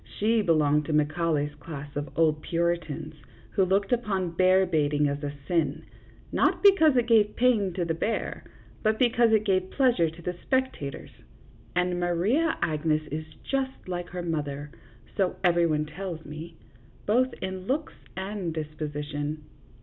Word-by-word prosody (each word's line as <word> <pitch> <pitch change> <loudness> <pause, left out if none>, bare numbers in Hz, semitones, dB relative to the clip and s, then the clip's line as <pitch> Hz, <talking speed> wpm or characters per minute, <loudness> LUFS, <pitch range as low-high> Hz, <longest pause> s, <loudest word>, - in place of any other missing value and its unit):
She 225 +2 +3
belonged 150 -5 +3
to 155 - -2
Macaulay's 150 -1 +1
class 145 -3 -9
of 145 +1 -3
old 155 -2 +3
Puritans, 165 -2 -2 0.4
who 195 - +2
looked 195 +2 +1
upon 195 -7 0
bear 185 +2 +4
baiting 150 -3 +1
as 145 +1 -3
a 145 - -2 0.2
sin, 160 -5 0 0.5
not - - +2
because 320 -9 +6
it 240 - +3
gave 220 -3 +4
pain 230 -6 +3
to 175 -1 -1
the 165 - 0
bear, 215 +7 -2 0.4
but 215 0 +2
because 235 -1 +3
it 215 -1 +4
gave 190 -2 +1
pleasure 245 - +3
to 165 +2 -13
the 180 +1 -3
spectators, 260 - -2 0.6
and 180 0 +1
Maria 195 - +1
Agnes 155 0 +1
is 155 +1 -4 0.2
just 265 -4 -3
like 175 -1 -4
her 180 0 -5
mother, 145 -3 -3 0.4
so 190 -2 +1
every 175 -1 +4
one 150 -1 0
tells 165 +1 -6
me, 155 +3 -8 0.5
both 250 +5 +3
in 190 0 -5
looks 295 +4 -1 0.2
and 190 -3 -3
dis 155 -1 -4
position." 150 0 -4
175 Hz, 155 wpm, -27 LUFS, 155-205 Hz, 0.6 s, because